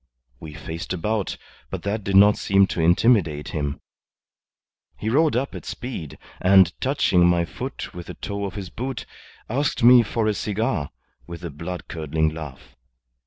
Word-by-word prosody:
We 75 -2 -9
faced 80 +4 -5
about, 105 +3 -2 0.3
but - - -5
that 105 +1 -2
did 100 0 -1
not 105 +2 +7
seem 100 0 +3
to 85 - -2
intimidate 85 -3 +3
him. 75 -2 -3 1.2
He 110 - -2
rode 155 +2 +3
up 135 +3 -1
at - - -7
speed, 120 - -6 0.2
and 95 -2 +6
touching 95 -10 +3
my 85 -1 +2
foot - - -7
with 85 -1 -8
the - - -7
toe 100 -1 -4
of 95 - -6
his 95 -3 -6
boot, 130 +1 -5 0.4
asked 135 +1 -1
me 125 0 +9
for 115 0 -1
a 110 - +2
cigar, 105 -8 -2 0.4
with 85 +1 -8
a 85 - -5
blood 85 +5 -6
curdling 80 -1 -1
laugh. 75 -4 -9
95 Hz, 165 wpm, -23 LUFS, 80-110 Hz, 1.2 s, me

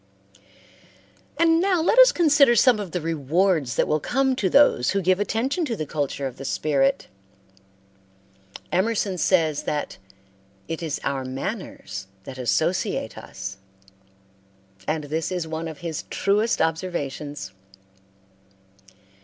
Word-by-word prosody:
And 330 0 +4
now 375 -2 +2
let 355 +9 +3
us - - +9
consider 300 - +4
some 240 -1 +5
of 200 -3 -5
the 180 +1 -3
rewards 160 - 0
that - - +1
will 155 - +1
come 265 - +1
to 195 -6 0
those 275 - +4
who 195 - +1
give 185 +2 +3
attention 245 - -1
to 240 -6 -2
the 155 - -4
culture 145 -2 -3
of 130 - -5
the - - -8
spirit. 135 -1 +1 1.7
Emerson 195 -1 0
says 160 -3 +2
that 150 -1 -3 0.7
"it 165 0 -4
is 160 -3 -3
our 135 -1 -2
manners 135 - -6 0.2
that 130 +3 -9
associate 125 -4 0
us," 95 0 -8 1.3
and 155 0 -1
this 155 +4 -3
is 180 -3 -2
one 160 +1 -4
of 160 -2 -7
his 160 -3 -4
truest 210 0 +1
observations. 150 - -3
165 Hz, 130 wpm, -24 LUFS, 145-225 Hz, 1.7 s, us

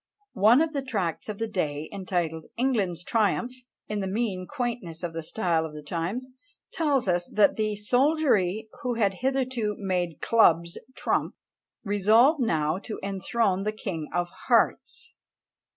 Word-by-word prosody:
One 230 +7 +7
of 325 -1 -3
the 280 - -1
tracts 205 - -3
of 210 - -4
the 225 - -1
day, 155 -7 -2
entitled 175 -5 -2
"England's 205 -9 0
Triumph," 225 +4 +1 0.4
in 210 -1 -2
the 195 - -2
mean 190 -3 -2
quaintness 235 - -4
of 170 -1 -3
the 165 - -4
style 165 -1 0
of 155 -1 -7
the 150 - -8
times, 180 - -3 0.4
tells 285 -8 +1
us 175 -1 0
that 210 -2 +5
"The 215 -1 -1
soldiery, 220 - +2
who 250 -1 -1
had 205 -4 +2
hitherto 255 -5 0
made 180 -5 -2
clubs 170 -7 +3 0.2
trump, - - -1 0.5
resolve 220 - +4
now 160 - +1
to 215 +1 -7
enthrone 195 0 0
the 210 +2 -1
king 175 -8 -5
of 175 0 -1 0.2
hearts." - - +1
205 Hz, 150 wpm, -26 LUFS, 175-235 Hz, 0.5 s, One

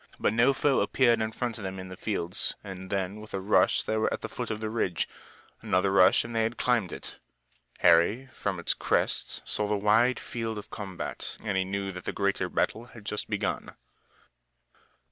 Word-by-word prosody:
But - - +2
no 120 +4 +5
foe 135 0 +2
appeared 115 +2 +3
in 110 0 -1
front 115 0 -3
of - - -7
them 95 0 -4
in 95 0 -7
the 95 - -7
fields, 90 -3 -1
and 95 -2 -8
then 100 +1 -2
with 110 - -7
a - - -1
rush 100 +3 +3
they 110 - -1
were 110 - +1
at - - -3
the - - -5
foot - - -5
of 110 -1 -3
the 110 0 -3
ridge. 95 -7 0 0.5
Another 100 -3 +2
rush 95 -1 +6
and 115 0 -7
they 115 - +3
had 115 +2 -1
climbed 120 -8 +1
it. - - -7 0.6
Harry 105 +11 +5
from 95 -3 -3
its 85 - +2
crest - - -1
saw 105 - 0
the 105 0 +1
wide 115 +5 +3
field 115 -2 -4
of 105 - -9
combat 95 -4 -5
and 105 -3 -1
he 95 - +2
knew 100 0 -2
that 90 -1 -9
the - - -2
greater 100 -1 0
battle 115 +2 0
had 115 -3 -14
just 105 - -3
begun. - - -2
105 Hz, 205 wpm, -28 LUFS, 95-115 Hz, 0.6 s, rush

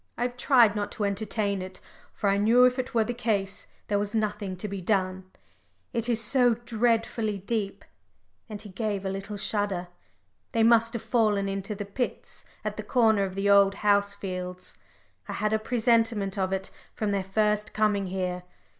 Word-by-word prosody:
I 240 - -1
have 245 0 -2
tried 245 -4 +4
not 205 -1 -2
to 210 - -3
entertain 200 0 -1
it, 185 0 -8 0.3
for 205 - -2
I 200 0 +3
knew 235 +4 +6
if 250 +1 +2
it 255 -1 -4
were 225 - +4
the 245 - -3
case, 205 -5 -1 0.2
there 205 -1 +1
was 205 +1 -3
nothing 210 -3 -2
to 210 - -4
be 200 -1 -5
done. 185 -1 0 0.7
It 235 0 -1
is 230 -2 +2
so 245 +1 +4
dreadfully 230 -2 0
deep 200 +1 -3 0.3
" - - -43
and 210 -1 -6
he 210 0 -8
gave 200 0 -3
a 190 - -1
little 195 +2 -5
shudder. 200 -4 0 0.6
"They 225 - +3
must 230 0 +4
have 235 - -4
fallen 215 -4 +1
into 195 +2 -3
the 205 0 -5
pits 240 +5 -5 0.2
at - - -3
the - - -4
corner 220 -5 +3
of 190 -1 -6
the 195 +1 -1
Old 200 -1 +5
House 200 0 +3
fields. 185 -2 -6 0.5
I - - -4
had 215 0 -1
a 220 - +2
presentiment 225 -3 +1
of 190 -2 -1
it 190 0 -2 0.2
from 215 -2 -1
their 200 -1 0
first 210 +2 0
coming 210 -2 +1
here. 180 -1 -3
210 Hz, 190 wpm, -27 LUFS, 195-225 Hz, 0.7 s, knew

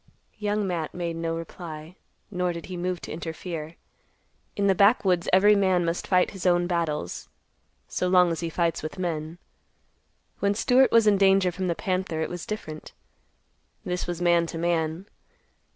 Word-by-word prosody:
Young 210 0 0
Matt 170 -4 -3
made 170 -2 -3
no 165 0 -2
reply, 165 0 -8 0.4
nor 180 -2 -1
did 170 -1 -7
he 185 - -7
move 180 0 -3
to - - -8
interfere. 160 0 -6 0.8
In 200 - 0
the 195 - +5
backwoods 190 -3 +3
every 205 +3 +6
man 185 -3 +2
must 165 +1 -2
fight 180 -1 +3
his 190 -2 -3
own 175 0 +3
battles, 165 - -2 0.6
so 180 - -1
long 180 -1 +5
as 165 - -3
he 170 - -3
fights 170 0 0
with 155 - -6
men. 165 -2 -3 1.0
When 200 0 +1
Stewart 255 +4 +4
was 230 -1 +5
in 205 -2 +4
danger 195 -2 +4
from 185 +1 -3
the 170 - 0
panther, 185 -3 -2
it - - -2
was 175 -1 -6
different. 155 -8 -6 0.9
This 180 0 -3
was 175 0 -3
man 170 -1 +3
to 165 - -6
man. 165 +1 -1
175 Hz, 170 wpm, -26 LUFS, 165-190 Hz, 1.0 s, every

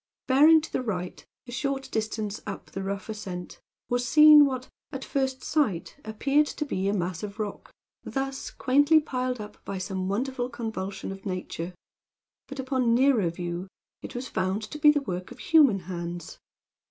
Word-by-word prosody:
Bearing 300 +5 +6
to - - -9
the - - 0
right, 180 -7 -4 0.2
a - - -8
short 270 +1 -2
distance 215 -1 -2
up 200 - -7
the 195 - -4
rough 195 0 -4
ascent, 190 -5 -7 0.3
was 245 0 0
seen 300 +1 +9
what, 260 -1 -4 0.2
at 270 -3 -5
first 265 -1 -1
sight, 255 - 0
appeared 275 +7 +2
to 300 - -4
be 195 -8 -2
a 200 - +1
mass 180 -3 -2
of 205 0 -6
rock, 210 -2 -5 0.3
thus 270 0 -3
quaintly 290 +4 +4
piled 255 -4 -2
up 210 0 -10
by 195 - -4
some 190 0 -3
wonderful 250 +4 -1
convulsion 200 -5 -5
of 195 0 -9
nature; 180 -1 -4 0.7
but, 280 - -8
upon 260 -3 +1
nearer 245 -8 +4
view, 175 +2 -5 0.3
it - - -9
was 250 +2 -4
found 190 +3 -1
to 300 - -7
be 300 - +7
the 295 -1 +4
work 185 -7 -5
of - - -11
human 280 - +4
hands. 175 -1 -6
225 Hz, 170 wpm, -27 LUFS, 190-270 Hz, 0.7 s, seen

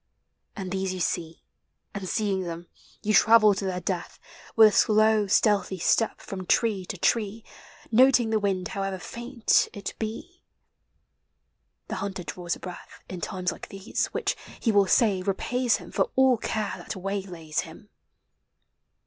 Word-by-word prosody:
And 190 -4 -6
these 190 -1 -2
you - - -6
see, 165 -1 -3 0.5
And, 195 -3 -5
seeing 205 -4 0
them, 170 -1 -6 0.4
you 215 - +1
travel. 215 0 +6
to 195 0 -4
their 185 -1 -2
death 180 0 -4 0.4
With 220 -1 +8
a 205 - -4
slow, 215 -1 +4
stealthy 200 -1 +2
step, 225 +5 +1
from 185 -2 -7
tree 210 -5 +1
to 195 - -5
tree, 220 +3 0 0.5
Noting 245 -1 +5
the 220 - +2
wind, 195 -3 -1
however 195 -1 -3
faint 235 +4 0
it 200 -2 -6
be. 230 +12 -6 1.5
The - - -4
hunter 195 -2 -4
draws 170 +2 -4
a - - -14
breath 180 -1 -10
In 185 -2 -6
times 185 0 -2
like - - -9
these, 195 +2 -2
which, - - -2 0.2
he 230 - +1
will 200 -2 +4
say, 200 -3 +3
repays 235 +6 0
him - - -12
For - - 0
all 265 -2 +5
care 215 -1 -2
that - - -7
waylays 185 -5 -4
him. - - -7
200 Hz, 155 wpm, -26 LUFS, 185-220 Hz, 1.5 s, With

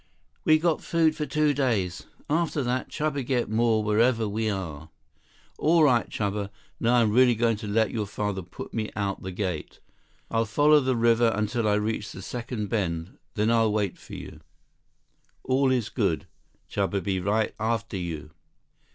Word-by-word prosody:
We 155 - +6
got 165 0 +1
food 160 -2 +2
for 150 - -3
two 150 +1 +2
days. 110 -10 -1 0.2
After 155 -2 0
that, 125 +1 -1
Chuba 150 -2 -2
get 120 -3 -1
more 110 -1 +2
wherever 110 +2 +2
we 110 +2 -1
are." 85 -6 -5 0.7
"All 165 +1 +4
right, 125 -5 +3
Chuba. 100 -1 -2 0.3
Now 120 +1 +3
I'm 115 -3 +4
really 125 +1 +5
going 115 -1 +1
to 105 0 -7
let 110 +2 +2
your 110 -3 -2
father 100 -1 -3
put 90 0 -9
me 110 -2 -2
out 100 -2 -2
the 95 - -5
gate. 90 -5 -4 0.5
I'll 115 0 +2
follow 145 +8 +5
the 130 -2 0
river 115 0 +4
until 110 +2 0
I 105 - +3
reach 105 0 -2
the 95 - -9
second 120 -2 -4
bend. 85 -5 -2 0.2
Then 110 +2 +2
I'll 115 -2 +3
wait 105 -4 0
for - - -10
you." - - -9 1.0
"All 130 +1 +2
is 125 -4 0
good. - - 0 0.4
Chuba 100 0 -1
be 95 0 0
right 105 +4 0
after 115 0 -1
you. 80 -4 -5
110 Hz, 170 wpm, -26 LUFS, 100-125 Hz, 1.0 s, We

